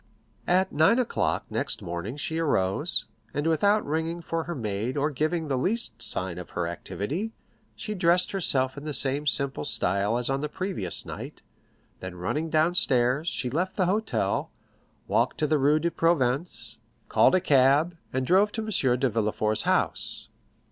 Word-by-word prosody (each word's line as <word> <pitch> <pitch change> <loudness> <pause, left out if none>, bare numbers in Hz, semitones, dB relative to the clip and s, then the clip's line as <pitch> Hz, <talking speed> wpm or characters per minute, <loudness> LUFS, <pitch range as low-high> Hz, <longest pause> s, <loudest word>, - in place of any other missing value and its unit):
At 185 +2 +2
nine 160 +10 +4
o'clock 250 -3 0
next - - -1
morning 85 +9 -5
she 160 +2 -3
arose, 95 -12 +1 0.3
and 145 +2 -1
without 200 +7 +2
ringing 160 +3 -2
for 165 0 -3
her 175 - -4
maid 110 +1 -3
or 145 +2 +1
giving 155 +4 -1
the 135 -3 0
least 185 - -1
sign 90 -5 0
of 90 - -9
her 90 - -2
activity, 140 - -4 0.4
she 215 - -5
dressed 180 -2 +2
herself 130 -9 +2
in - - -12
the 150 -2 -3
same 140 +2 +1
simple 140 -1 +1
style 100 -4 +1
as 120 - 0
on 135 0 -1
the 150 - -3
previous 165 - -3
night; - - -8 0.6
then 95 -1 -7
running 150 - -2
downstairs, 155 -4 +2
she 125 -7 -2
left 180 +7 -1
the 185 - +2
hotel, 210 +5 0 0.6
walked - - +1
to 155 - +1
the 150 0 +2
Rue 145 +3 +4
de 170 +2 -1
Provence, 130 -8 0 0.3
called - - +4
a - - +4
cab, 145 +1 +3 0.2
and 130 0 -1
drove 195 +7 +4
to 220 - -3
M. 135 - +1
de 135 - +2
Villefort's 110 -1 0
house. - - 0
145 Hz, 165 wpm, -26 LUFS, 120-175 Hz, 0.6 s, nine